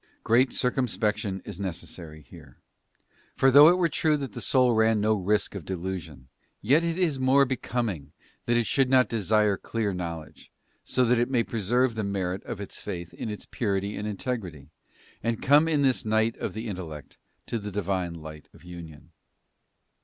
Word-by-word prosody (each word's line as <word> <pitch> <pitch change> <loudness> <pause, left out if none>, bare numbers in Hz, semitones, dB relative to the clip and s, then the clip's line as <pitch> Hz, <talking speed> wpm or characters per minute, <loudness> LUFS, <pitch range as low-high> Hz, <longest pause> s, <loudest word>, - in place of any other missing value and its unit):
Great 120 +3 +3
circumspection 110 -6 -1
is 100 -3 -8
necessary 85 -4 -7
here; - - -15 0.8
for 135 - +4
though 145 +4 +9
it 180 - +4
were 175 -2 +3
true 155 0 +1
that 135 -7 -6
the - - -6
soul 125 -2 +3
ran 110 0 +3
no 110 +1 +2
risk 105 +1 0
of 100 -4 -6
delusion, 85 -7 -6 0.3
yet 140 +10 +3
is 170 -3 0
it - - -6
more 135 +2 +5
becoming 115 - -3 0.4
that 120 0 +3
it 120 - +1
should 135 +1 +2
not 130 -1 +5
desire 105 -2 +1
clear 110 -2 -2
knowledge, 85 -5 -7 0.3
so 130 - +1
that 120 0 +3
it 120 +1 +1
may 125 -3 +2
preserve 120 +4 0
the 110 -1 -3
merit 95 -2 -2
of - - -6
its 100 - -7
faith 85 -4 -6
in - - -5
its 105 - -6
purity 100 -2 -2
and 105 - -4
integrity, 95 - -5 0.5
and 115 -1 -2
come 145 +4 +5
in 150 -3 +2
this 130 -2 +2
Night 110 +1 +1
of - - -4
the 110 +2 -5
In 100 -4 -4
tellect 80 -5 -9 0.3
to 115 - -3
the 105 0 -6
Divine 95 -3 -2
light 80 -2 -10
of - - -18
Union. 85 -4 -11
105 Hz, 180 wpm, -27 LUFS, 90-125 Hz, 0.8 s, though